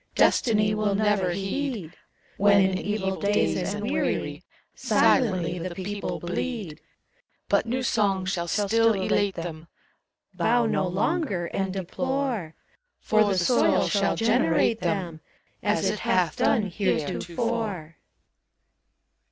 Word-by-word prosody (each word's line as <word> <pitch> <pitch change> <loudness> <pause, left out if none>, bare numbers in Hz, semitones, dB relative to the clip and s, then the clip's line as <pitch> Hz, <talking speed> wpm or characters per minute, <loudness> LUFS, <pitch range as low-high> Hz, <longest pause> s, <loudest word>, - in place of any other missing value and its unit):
Destiny 210 -3 +3
will 210 -2 0
never 205 -3 +1
heed; 195 - -3 0.4
When 200 0 +5
in 190 -1 +2
evil 190 -2 -2
days 205 +1 0
and - - -4
weary, - - -2 0.3
Silently 185 -8 +2
the 175 +1 -5
people 200 +2 -4
bleed. 175 -2 -4 0.7
But - - +1
new 255 +2 -1
songs 195 -5 +1
shall 170 -2 -2
still 220 +4 +2
elate 195 0 0
them: 165 -1 -7 0.7
Bow 240 0 +2
no 195 -4 0
longer 200 - -1
and 195 -1 -1
deplore! 220 - -3 0.4
For 215 0 +3
the 200 -2 0
soil 210 +8 +3
shall 200 -1 +1
generate 225 -2 +2
them, 175 -7 -2 0.4
As - - +1
it - - -1
hath - - +1
done 225 - +2
heretofore. 190 0 -2
200 Hz, 115 wpm, -25 LUFS, 180-225 Hz, 0.7 s, When